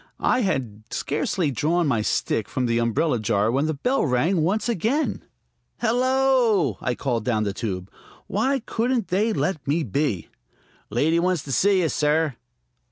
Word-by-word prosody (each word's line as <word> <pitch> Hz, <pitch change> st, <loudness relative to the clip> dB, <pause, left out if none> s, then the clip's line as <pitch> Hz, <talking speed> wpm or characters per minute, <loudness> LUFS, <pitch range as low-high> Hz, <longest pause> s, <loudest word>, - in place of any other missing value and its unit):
I 255 Hz, -, +2 dB
had 130 Hz, -, -2 dB
scarcely 150 Hz, +2 st, -1 dB
drawn 165 Hz, +6 st, +1 dB
my 120 Hz, -7 st, +1 dB
stick 105 Hz, 0 st, -1 dB
from 130 Hz, -, -1 dB
the 115 Hz, -1 st, +1 dB
umbrella 120 Hz, +4 st, +1 dB
jar 105 Hz, +1 st, +1 dB
when 140 Hz, +5 st, +1 dB
the 155 Hz, -, -1 dB
bell 250 Hz, -, 0 dB
rang 155 Hz, +6 st, +1 dB
once 200 Hz, +8 st, 0 dB
again. 235 Hz, -, 0 dB, 0.6 s
"Hello!" 245 Hz, -, +2 dB
I 125 Hz, -, -1 dB
called 120 Hz, -5 st, -2 dB
down 110 Hz, -3 st, 0 dB
the 100 Hz, -2 st, -2 dB
tube. 95 Hz, -4 st, -4 dB, 0.3 s
Why 260 Hz, +7 st, 0 dB
couldn't 235 Hz, -2 st, -1 dB
they 210 Hz, +5 st, +1 dB
let 185 Hz, -8 st, -2 dB
me 155 Hz, +4 st, +1 dB
be? 125 Hz, -, -1 dB, 0.6 s
"Lady 150 Hz, +10 st, +2 dB
wants 180 Hz, -3 st, 0 dB
to 140 Hz, -, -7 dB
see 195 Hz, +7 st, +3 dB
you, 160 Hz, -, +1 dB
sir." 150 Hz, -2 st, +1 dB
155 Hz, 160 wpm, -24 LUFS, 120-205 Hz, 0.6 s, see